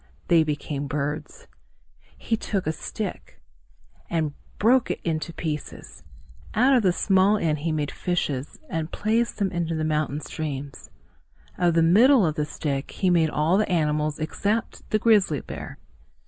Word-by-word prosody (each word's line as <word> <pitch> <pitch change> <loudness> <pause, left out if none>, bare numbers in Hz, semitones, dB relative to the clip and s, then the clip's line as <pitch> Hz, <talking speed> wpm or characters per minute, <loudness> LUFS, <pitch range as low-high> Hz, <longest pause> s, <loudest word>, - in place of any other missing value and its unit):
They 165 -2 +6
became 145 -1 -3
birds. 150 - -4 0.7
He 225 - -1
took 200 -3 -2
a 155 - +1
stick 210 +6 -6 0.7
and 160 -3 -1 0.2
broke 240 +4 +3
it - - -2
into 160 0 -2
pieces. 155 -3 -6 0.5
Out 255 +5 +5
of 250 - +5
the 190 -4 +3
small 195 +3 +3
end 155 -6 0
he 160 +2 -1
made 150 -2 -1
fishes 150 -6 -2
and 160 0 -3
placed 225 +3 0
them 200 -3 0
in 175 -2 -1
the 155 - -1
mountain 150 -2 0
streams. 145 -3 -6 0.7
Of 175 -2 +2
the 165 - +4
middle 220 +7 +6
of 155 - +1
the 150 -1 -1
stick, 140 -2 -3
he 185 -2 0
made 165 -2 +3
all 160 +6 +2
the 215 - 0
animals 150 -2 +1
except 205 +8 -2
the 215 - +2
grizzly 205 - +3
bear. - - -8
165 Hz, 155 wpm, -25 LUFS, 150-200 Hz, 0.7 s, They